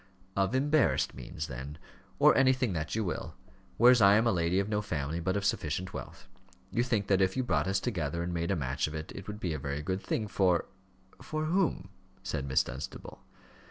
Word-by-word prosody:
"Of 100 +5 +1
embarrassed 145 +2 +2
means, 65 +4 -6
then, 65 +2 -7 0.4
or - - +6
anything 130 -5 +3
that 80 +1 -3
you 110 - 0
will; 90 - -4 0.4
whereas 120 0 +7
I 100 0 +7
am 110 +2 +3
a 115 - +4
lady 85 -1 +1
of 100 - 0
no 105 -1 0
family, 80 -4 -3
but 95 +3 0
of 100 - -2
sufficient 95 +2 -1
wealth. - - -8 0.4
You 120 - +1
think 115 -5 0
that 95 -1 +2
if 95 +3 +1
you 130 - +1
brought 125 - +1
us 95 0 +1
together 85 - -2
and 85 0 -3
made 85 0 -1
a 100 - +2
match 65 -3 -1
of 75 - -6
it, 80 0 -6
it 95 - -9
would 105 0 -6
be 90 -6 -2
a 75 - -4
very 70 +2 -4
good 95 +4 -2
thing 110 - -2
for 95 -3 +2 0.6
for 155 0 -3
whom?" 165 - 0 0.3
said 80 -7 -3
Miss 65 -1 +3
Dunstable. 65 +2 -8
95 Hz, 210 wpm, -30 LUFS, 80-110 Hz, 0.6 s, whereas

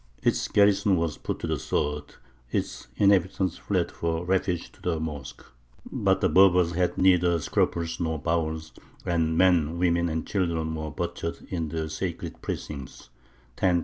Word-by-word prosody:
Its - - +1
garrison 100 -1 +4
was 80 -2 -2
put - - -3
to - - -5
the - - -1
sword; 75 0 -2 0.3
its - - -3
inhabitants 95 -2 +2
fled - - -1
for 85 +1 -2
refuge 90 -1 0
to - - -23
the 85 -3 -1
mosque; 75 -4 -6 0.5
but 95 -1 +1
the 95 - +4
Berbers 90 0 +5
had 90 +1 0
neither 90 -2 +4
scruples 85 +1 -1
nor 80 -2 -1
bowels, 80 0 -2 0.3
and 80 -2 +1
men, 85 -3 +3
women, 85 -1 +2
and 80 0 -2
children 85 -5 -1
were 80 -1 -4
butchered 85 +3 -4
in 85 -4 -2
the 80 0 -3
sacred 85 +3 -5
precincts 70 -4 -6 0.5
(1010). 90 -2 +3
85 Hz, 150 wpm, -26 LUFS, 80-90 Hz, 0.5 s, Berbers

